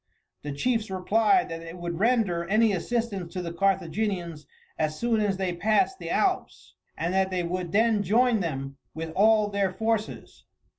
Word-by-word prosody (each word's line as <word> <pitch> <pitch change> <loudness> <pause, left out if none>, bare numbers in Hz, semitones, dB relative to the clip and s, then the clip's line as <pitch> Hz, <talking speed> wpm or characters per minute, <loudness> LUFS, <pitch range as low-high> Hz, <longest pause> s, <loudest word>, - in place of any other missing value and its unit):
The 145 - -5
chiefs 225 - -1
replied 220 - +2
that 165 0 -5
they 165 +1 -9
would 175 -1 -5
render 205 -7 +1
any 215 +1 +4
assistance 200 -2 -2
to 185 - -3
the 170 -1 -5
Carthaginians 180 -3 -1 0.3
as 155 -1 -1
soon 230 -2 +1
as 200 -2 0
they 190 -2 -1
passed 220 - +1
the - - -6
Alps, 380 -2 -1 0.2
and 170 +2 -1
that 190 0 +2
they 185 -1 -1
would 175 0 -3
then 220 +1 +3
join 225 +4 +3
them 135 -6 -4 0.2
with 160 0 -5
all 215 +4 +4
their 200 -2 0
forces. 220 +2 -3
195 Hz, 165 wpm, -26 LUFS, 170-220 Hz, 0.3 s, any